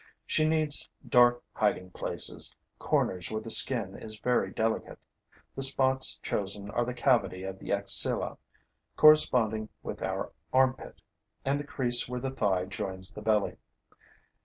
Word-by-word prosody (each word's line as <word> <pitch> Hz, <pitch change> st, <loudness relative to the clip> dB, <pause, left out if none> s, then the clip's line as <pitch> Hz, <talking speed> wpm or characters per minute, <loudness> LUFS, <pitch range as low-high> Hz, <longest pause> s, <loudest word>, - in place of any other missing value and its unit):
She 155 Hz, 0 st, 0 dB
needs 155 Hz, -2 st, +2 dB, 0.2 s
dark 120 Hz, 0 st, +3 dB
hiding 90 Hz, -4 st, -2 dB
places, -, -, +1 dB, 0.2 s
corners 90 Hz, -2 st, -2 dB
where 110 Hz, -, -4 dB
the 115 Hz, -, -2 dB
skin 110 Hz, -7 st, +2 dB
is 110 Hz, -1 st, -6 dB
very 125 Hz, -3 st, -1 dB
delicate. 110 Hz, +2 st, -3 dB, 0.6 s
The 135 Hz, -, -6 dB
spots 130 Hz, 0 st, +5 dB
chosen 100 Hz, 0 st, -2 dB
are 120 Hz, +2 st, -1 dB
the 125 Hz, 0 st, -6 dB
cavity 120 Hz, -7 st, 0 dB
of 95 Hz, 0 st, -8 dB
the -, -, -8 dB
axilla, 100 Hz, 0 st, +4 dB, 0.6 s
corresponding 115 Hz, -8 st, +3 dB
with -, -, -8 dB
our -, -, -4 dB, 0.2 s
armpit, 130 Hz, 0 st, -1 dB, 0.4 s
and 140 Hz, +1 st, -1 dB
the 145 Hz, -, -8 dB
crease 120 Hz, -3 st, +1 dB
where 125 Hz, 0 st, -5 dB
the 135 Hz, +1 st, -5 dB
thigh 95 Hz, -8 st, -1 dB
joins 95 Hz, -1 st, -5 dB
the 105 Hz, -, -10 dB
belly. 105 Hz, -1 st, -1 dB
115 Hz, 140 wpm, -27 LUFS, 100-130 Hz, 0.6 s, spots